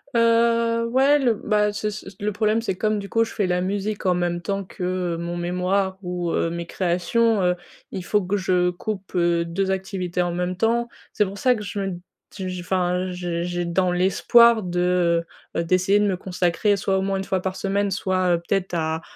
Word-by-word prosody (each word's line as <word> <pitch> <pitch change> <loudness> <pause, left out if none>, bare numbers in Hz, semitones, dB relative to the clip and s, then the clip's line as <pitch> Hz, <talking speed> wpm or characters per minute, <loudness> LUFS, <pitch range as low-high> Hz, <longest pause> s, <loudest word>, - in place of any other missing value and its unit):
Heu, 230 0 +3
ouais, 270 +4 +4
le 250 -4 +3
bah, 210 -1 0
c'est 210 +1 -2
ç 205 -2 -9
le 210 +1 0
problème, 215 +2 +1
c'est 210 -5 -2
comme, 215 +3 0
du 200 0 -7
coup, 225 0 +2
je - - -9
fais 205 - 0
la 180 0 +1
musique, 200 +3 -2
en 185 - +4
même 175 -1 -1
temps 195 +2 -2
que, 185 - -13 0.3
heu, - - -5
mon 170 +1 -4
mémoire 180 +2 -1
ou 180 -2 -3
heu, 165 - 0
mes 170 0 -4
créations, 195 +6 +1
heu, 180 0 +2 0.4
il 185 - -5
faut 205 +1 +1
que 195 +3 0
je 180 -1 +2
coupe, 190 +2 -5
heu, 170 -1 +2
2 185 +3 -2
activités 190 -2 -2
en 175 -1 -1
même 180 +1 -2
temps. 230 +4 +1 0.2
C'est 210 - +2
pour 195 +1 -7
ça 250 +4 +3
que 210 - -6
je 205 0 -5
me 195 - -1
d 175 - -6 0.4
j 190 -2 -4
je 185 -1 -5
enfin, 180 0 0
j'ai 175 -1 -3
j'ai 175 0 -2
dans 180 +2 +1
l'espoir 220 +6 +5
de, 175 -1 +1 0.3
heu - - +1
heu, - - -2
d'essayer 185 +4 +2
de 210 - +2
me 190 -3 0
consacrer 180 +2 +1
soit, 195 0 0
au - - 0
moins 195 0 -1
1 190 - -3
fois 190 -1 -1
par 190 0 -3
semaine, 200 +1 -1
soit, 185 -2 +1
heu, - - -2
peut-être, 195 -2 -1
à 160 -1 -1
190 Hz, 220 wpm, -23 LUFS, 180-210 Hz, 0.4 s, l'espoir